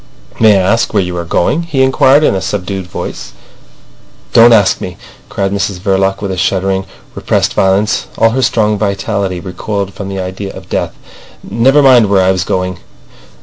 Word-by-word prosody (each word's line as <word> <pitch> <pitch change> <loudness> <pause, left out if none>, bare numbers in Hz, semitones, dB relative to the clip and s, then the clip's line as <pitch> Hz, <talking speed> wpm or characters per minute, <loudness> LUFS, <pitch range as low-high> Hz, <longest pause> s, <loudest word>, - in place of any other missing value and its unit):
"May 110 -3 +5
I 95 - +1
ask 115 +5 +2
you - - -16
where - - +2
you 90 0 -5
were 85 -1 -4
going?" 115 - 0
he 155 -6 0
inquired 130 +2 +4
in 150 - +3
a 95 - -2
subdued 95 -1 -4
voice. - - -7 1.0
"Don't 115 +1 +7
ask 105 -4 +3
me!" - - -6 0.3
cried 95 -1 -2
Mrs 100 -1 -2
Verloc 95 +1 0
with 100 - -2
a 95 - -4
shuddering, 95 +1 0 0.3
repressed - - -1
violence. 95 +3 +1
All 115 - +3
her 130 +3 -1
strong 105 -4 +1
vitality 100 -2 -2
recoiled 100 +2 -4
from 100 0 -7
the 95 -1 -5
idea 95 +1 -5
of - - -12
death. - - -3 0.5
"Never 135 +5 +3
mind 125 -5 +5
where 95 -2 +3
I 95 - +3
was 95 -1 -1
going. 90 0 -3
100 Hz, 185 wpm, -13 LUFS, 95-110 Hz, 1.0 s, Don't